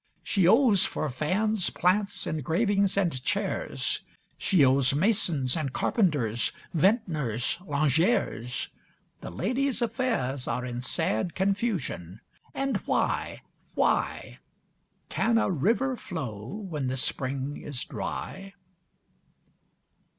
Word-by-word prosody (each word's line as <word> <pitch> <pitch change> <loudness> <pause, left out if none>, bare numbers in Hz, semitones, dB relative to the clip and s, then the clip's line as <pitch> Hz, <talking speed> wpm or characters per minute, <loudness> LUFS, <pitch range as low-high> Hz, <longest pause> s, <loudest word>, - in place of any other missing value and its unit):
She 190 -5 +2
owes 220 -2 +5
for 155 - -1
fans, 185 - 0
plants, 200 +3 0
engravings, 195 - +1
and 170 -10 +1
chairs. 65 - -1 0.3
She 170 -8 +3
owes 135 0 +4
masons 165 - +2
and 155 -5 -2
carpenters, 140 - +1 0.2
vintners, 160 - +1
lingeres. 145 - +1 0.5
The - - -7
lady's 250 - -1
affairs 225 - -1
are 125 +2 -2
in 120 -1 -4
sad 125 +4 -1
confusion. 190 - -1 0.4
And 270 -4 0
why? - - 0 0.3
Why? - - 0 0.7
Can 230 0 +2
a 225 - +2
river 230 - +1
flow 130 - -6
when 175 - -4
the 130 +1 -2
spring 135 +2 -2
is 140 -4 -5
dry? 195 0 -6
165 Hz, 100 wpm, -27 LUFS, 130-205 Hz, 0.7 s, owes